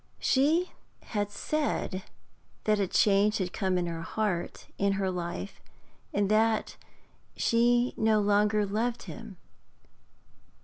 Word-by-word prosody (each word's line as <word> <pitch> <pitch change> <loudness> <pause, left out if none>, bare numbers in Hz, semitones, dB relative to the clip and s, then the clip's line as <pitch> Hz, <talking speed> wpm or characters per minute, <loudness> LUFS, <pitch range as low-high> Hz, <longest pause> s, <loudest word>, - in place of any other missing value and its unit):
She 315 +7 +2 0.3
had 205 -2 -2
said 205 -3 -2 0.6
that 215 -1 +2
a 195 - +1
change 205 +3 +3
had 180 -2 -3
come 190 -3 0
in 175 - 0
her 165 -1 -4
heart, 190 -1 -2
in 200 0 +2
her 195 -1 -1
life, 170 - -5 0.5
and 200 0 +1
that 220 0 +2 0.6
she 240 +1 +3
no 220 -1 +3
longer 210 +1 +2
loved 225 +4 -2
him. 225 -4 -9
210 Hz, 120 wpm, -29 LUFS, 195-225 Hz, 0.6 s, change